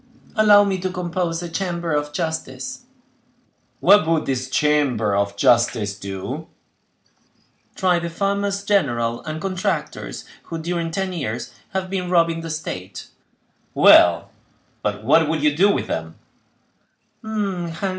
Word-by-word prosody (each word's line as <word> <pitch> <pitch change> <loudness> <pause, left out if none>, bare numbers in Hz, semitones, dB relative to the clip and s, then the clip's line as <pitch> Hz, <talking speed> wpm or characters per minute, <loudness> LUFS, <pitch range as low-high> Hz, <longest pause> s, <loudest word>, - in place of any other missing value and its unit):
"Allow 210 -2 +6
me 195 -2 -1
to 185 +1 -2
compose 175 -2 -2
a - - -4
chamber 170 -1 -3
of 150 0 -1
justice." 165 - -4 1.0
"What 200 -5 +6
would 165 -1 +1
this 130 -1 -2
chamber 130 -8 +1
of 100 0 -1
justice 115 -3 +2
do?" 100 +10 -6 1.3
"Try 180 -3 +2
the 170 0 -4
farmers 200 +2 -1
general 120 - 0
and 155 0 -4
contractors, 185 0 -3 0.2
who, 165 - -5
during 170 0 -2
ten 190 +2 -3
years, 125 -9 -4 0.2
have 190 -1 -3
been 180 -2 -2
robbing 165 -2 +2
the 165 - -6
state." 95 - -6 0.7
"Well, - - +6 0.5
but 105 0 -3
what 155 +6 +4
would 160 -2 -1
you 150 -1 +3
do 195 +6 +4
with - - 0
them?" 80 0 -4
165 Hz, 125 wpm, -21 LUFS, 125-185 Hz, 1.3 s, Allow